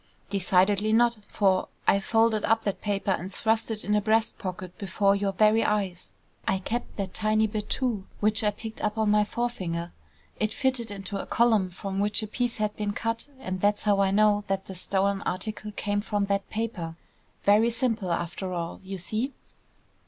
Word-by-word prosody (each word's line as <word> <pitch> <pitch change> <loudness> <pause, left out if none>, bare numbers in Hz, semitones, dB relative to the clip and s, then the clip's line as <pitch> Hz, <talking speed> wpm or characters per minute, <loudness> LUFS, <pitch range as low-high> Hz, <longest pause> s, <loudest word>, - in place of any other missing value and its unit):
"Decidedly 200 +2 +3
not, 235 0 +4
for 190 -2 +2 0.2
I 200 - +4
folded 225 +1 +2
up 225 +1 +2
that 200 - -2
paper 200 -1 0
and 185 +1 -2
thrust 220 +3 0
it 215 -1 -3
in 210 - +1
a 210 - +3
breast 220 +1 +1
pocket 185 -2 -6
before 200 +1 +2
your 200 0 0
very 215 +3 +4
eyes. 195 -4 -1 0.4
I - - +3
kept 230 +6 -4
that 195 -2 -3
tiny 215 0 +2
bit, 210 -1 -3
too, 235 -7 -1
which 215 +1 +2
I 210 - +4
picked 220 +2 -7
up 210 +1 -1
on 215 -1 +2
my 210 0 +5
forefinger. 185 -7 -3 0.5
It 215 0 0
fitted 260 -4 0
into 195 0 -5
a - - -9
column 220 -5 +3
from 190 +2 -5
which 210 +2 +2
a - - -3
piece 245 +2 -1
had 210 -1 -1
been 205 -1 -2
cut, 230 +4 -2
and 185 -8 -4
that's 205 0 +2
how 205 -2 +3
I 195 -1 +4
know 205 +1 +4
that 195 0 -1
the 190 - -7
stolen 195 +2 +1
article 210 +3 -3
came 205 0 -1
from 205 -1 0
that 200 0 -1
paper. 210 -7 -3 0.5
Very 210 +3 +5
simple, 230 -6 -1
after 175 +2 -2
all, 170 -1 -4
you 190 0 -6
see!" 220 +9 -2
205 Hz, 190 wpm, -27 LUFS, 195-220 Hz, 0.5 s, my